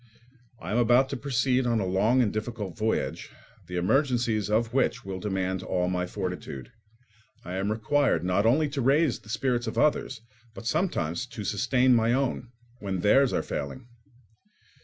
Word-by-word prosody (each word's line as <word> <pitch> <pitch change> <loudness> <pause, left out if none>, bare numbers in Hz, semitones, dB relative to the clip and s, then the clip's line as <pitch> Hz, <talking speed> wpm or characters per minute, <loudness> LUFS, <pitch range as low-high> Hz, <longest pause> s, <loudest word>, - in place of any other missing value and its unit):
I 90 - -6
am 115 - +2
about 120 +3 +4
to 140 - -3
proceed 130 -1 0
on 115 -2 +1
a 100 - -1
long 105 +7 +3
and 105 - -1
difficult 110 -4 -4
voyage, 110 +1 -2 0.4
the 90 - -6
emergencies 115 +1 +1
of 110 +2 +1
which 125 -2 0
will 95 -1 -5
demand 95 -1 -2
all 90 -1 -1
my 90 0 -1
fortitude: 90 -9 -6 0.7
I 90 - -6
am 100 +2 -1
required 110 - +1
not 90 +3 +1
only 150 +6 +3
to 140 -1 -3
raise 140 +1 +2
the 105 - -17
spirits 120 +2 -1
of - - -4
others, 135 -5 +1 0.3
but - - -9
sometimes 110 - -1
to 110 -3 -7
sustain 125 +5 +2
my 115 0 +3
own, 125 -2 -1 0.3
when 95 -3 -3
theirs 130 +7 +4
are - - 0
failing. 115 - -5
115 Hz, 165 wpm, -27 LUFS, 95-130 Hz, 0.7 s, about